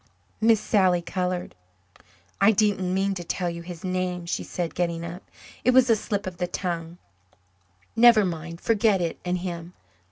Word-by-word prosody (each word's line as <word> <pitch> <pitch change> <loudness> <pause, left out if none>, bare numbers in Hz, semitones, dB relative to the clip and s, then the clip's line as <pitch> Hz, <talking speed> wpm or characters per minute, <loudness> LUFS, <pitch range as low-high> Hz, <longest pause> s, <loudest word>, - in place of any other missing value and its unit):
Miss 225 -1 +5
Sally 185 -5 +2
coloured. 180 0 -3 0.9
"I 210 - +7
didn't 195 -3 +1
mean 195 +1 +1
to 180 -2 -5
tell 175 +1 -2
you 170 0 -7
his 170 -1 -9
name," 185 -1 -2
she 170 - -2
said, 175 -2 -4
getting 170 -1 -2
up. 175 +2 -7 0.4
"It 250 +1 +3
was 260 -2 +6
a - - +6
slip 205 -1 -3
of 185 -2 -6
the 180 0 -1
tongue. 170 -2 -4 1.0
Never 230 -3 +7
mind 170 -1 -5
forget 220 -3 +2
it 170 -2 -2
and 180 0 -1
him. 175 -1 -6
180 Hz, 165 wpm, -25 LUFS, 175-200 Hz, 1.0 s, I